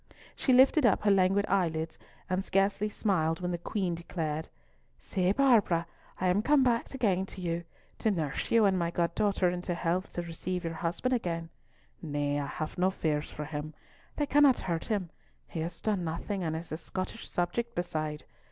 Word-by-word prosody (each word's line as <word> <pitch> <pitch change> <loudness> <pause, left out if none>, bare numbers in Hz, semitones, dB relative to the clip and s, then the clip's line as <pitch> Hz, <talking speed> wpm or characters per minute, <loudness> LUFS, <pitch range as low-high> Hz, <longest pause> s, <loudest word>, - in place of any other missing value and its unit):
She 265 - +1
lifted 265 +4 +6
up 230 -4 +4
her 205 - +4
languid 195 +1 +4
eyelids, 165 -4 0 0.3
and 185 +1 0
scarcely 195 +2 +1
smiled 165 -7 0
when 180 -1 -2
the 175 - -2
Queen 185 0 -1
declared, 160 -2 -3 0.5
"See, 185 -1 0
Barbara, 210 -9 +4 0.3
I 185 - +1
am 180 +3 +3
come 280 +3 +4
back 240 -1 +1
again 195 -7 +1
to - - -10
you, 170 -1 -2 0.3
to 220 - +2
nurse 160 -8 -2
you 230 -2 +5
and 190 -2 +3
my 170 -1 0
god 170 0 0
daughter 200 -2 +2
into 180 0 -3
health 175 +2 -1
to 175 - -3
receive 175 +2 -4
your 165 -1 -3
husband 170 +10 -1
again. 170 -8 -2 0.5
Nay, 145 -2 -1
have 150 +3 -4
no 185 +1 +4
fears 155 -5 -1
for 150 - -6
him. 150 0 -5 0.4
They 295 - +1
cannot 285 -2 +5
hurt 170 -3 -2
him. 200 -6 -2 0.4
He - - -5
has 165 +2 -3
done 205 -5 0
nothing, 170 +4 -3
and 160 -2 -1
is 165 +1 -6
a 155 - -2
Scottish 185 +6 -5
subject 235 +7 -1
beside. 155 -4 -2
180 Hz, 180 wpm, -30 LUFS, 165-205 Hz, 0.5 s, lifted